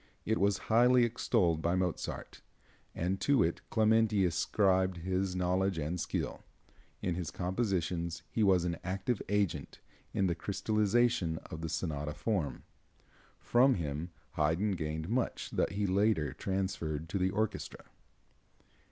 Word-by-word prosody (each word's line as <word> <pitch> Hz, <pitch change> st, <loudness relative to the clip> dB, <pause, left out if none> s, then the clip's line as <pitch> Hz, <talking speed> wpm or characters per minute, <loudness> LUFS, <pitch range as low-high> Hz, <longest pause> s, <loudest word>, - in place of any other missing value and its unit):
It 110 Hz, +1 st, +1 dB
was 100 Hz, -1 st, +3 dB
highly 120 Hz, +2 st, +5 dB
extolled 110 Hz, -8 st, +1 dB
by 85 Hz, +2 st, +1 dB
Mozart, 90 Hz, -2 st, -3 dB, 0.5 s
and 90 Hz, +3 st, -1 dB
to 140 Hz, -6 st, +4 dB
it 85 Hz, -, -1 dB
Clementi 110 Hz, -2 st, +3 dB
ascribed 95 Hz, +1 st, +2 dB
his 95 Hz, +2 st, -1 dB
knowledge 90 Hz, +1 st, +1 dB
and 80 Hz, +3 st, -2 dB
skill. -, -, -3 dB, 0.6 s
In 90 Hz, -, 0 dB
his 85 Hz, -2 st, -3 dB
compositions 90 Hz, -3 st, -2 dB
he 115 Hz, -, -1 dB
was 95 Hz, -4 st, +4 dB
an 85 Hz, -1 st, -1 dB
active 95 Hz, +5 st, -2 dB
agent 100 Hz, -8 st, -1 dB, 0.3 s
in 95 Hz, -, +1 dB
the 90 Hz, -, +2 dB
crystallization 105 Hz, -1 st, +1 dB
of 80 Hz, -, -6 dB
the 80 Hz, -, -3 dB
sonata 75 Hz, -3 st, -3 dB
form. 80 Hz, -1 st, -2 dB, 0.8 s
From 125 Hz, +2 st, +4 dB
him 80 Hz, 0 st, -3 dB, 0.2 s
Haydn 80 Hz, +7 st, +1 dB
gained 80 Hz, -2 st, -3 dB
much 120 Hz, +3 st, -1 dB
that -, -, 0 dB
he 100 Hz, +1 st, 0 dB
later 100 Hz, -5 st, +2 dB
transferred 85 Hz, -5 st, -2 dB
to 100 Hz, -, -1 dB
the 90 Hz, +1 st, +2 dB
orchestra. 105 Hz, 0 st, -3 dB
95 Hz, 135 wpm, -32 LUFS, 85-105 Hz, 0.8 s, highly